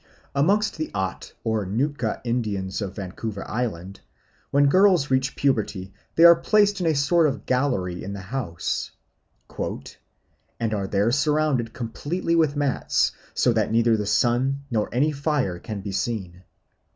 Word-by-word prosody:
Amongst 200 +10 +2
the 155 - -3
Aht 95 -2 -3
or 110 -2 0
Nootka 115 +4 -2
Indians 105 -5 -2
of 100 -1 -4
Vancouver 100 +1 -6
Island, 100 -5 -4 0.5
when 140 +1 +4
girls 180 -2 +4
reach 130 +1 +1
puberty 105 -8 -1 0.2
they 165 - +5
are 170 0 +10
placed 205 +3 +2
in 170 - +1
a 160 - +2
sort 155 +4 +3
of 140 -2 -4
gallery 125 -10 0
in 100 - -5
the 100 - -6
house 95 -6 -3 1.7
"and 115 -2 -1
are 100 -2 -2
there 100 +4 +1
surrounded 145 -4 +1
completely 145 - -2
with 155 -3 +2
mats, 145 -3 +1 0.2
so - - +3
that - - 0
neither 115 0 +3
the 105 -2 -2
sun 125 +6 +1
nor 110 -3 0
any 140 +6 +2
fire 140 - -1
can 105 0 -6
be 100 0 -5
seen. 95 -4 -4
120 Hz, 150 wpm, -24 LUFS, 100-145 Hz, 1.7 s, are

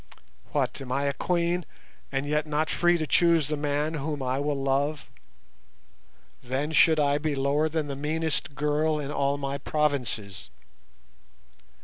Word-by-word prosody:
What, - - -1
am 130 -2 -7
I 140 +2 0
a 140 0 0
Queen, 175 +2 0 0.5
and 135 - -1
yet 150 +1 0
not 150 +1 0
free 175 0 +3
to 155 - -2
choose 165 -2 +3
the 155 - 0
man 150 +1 -1
whom 150 -2 -3
I 130 +1 -1
will 145 -1 -1
love? 140 +2 0 1.3
Then 135 +5 -2
should 160 0 +5
I 145 0 +2
be 150 -1 -1
lower 140 +3 +1
than 155 -1 -1
the 140 -1 -4
meanest 150 0 -2
girl 150 +1 +1
in 145 -1 -4
all 140 0 0
my 140 0 -3
provinces. 125 -10 -2
150 Hz, 150 wpm, -27 LUFS, 140-155 Hz, 1.3 s, should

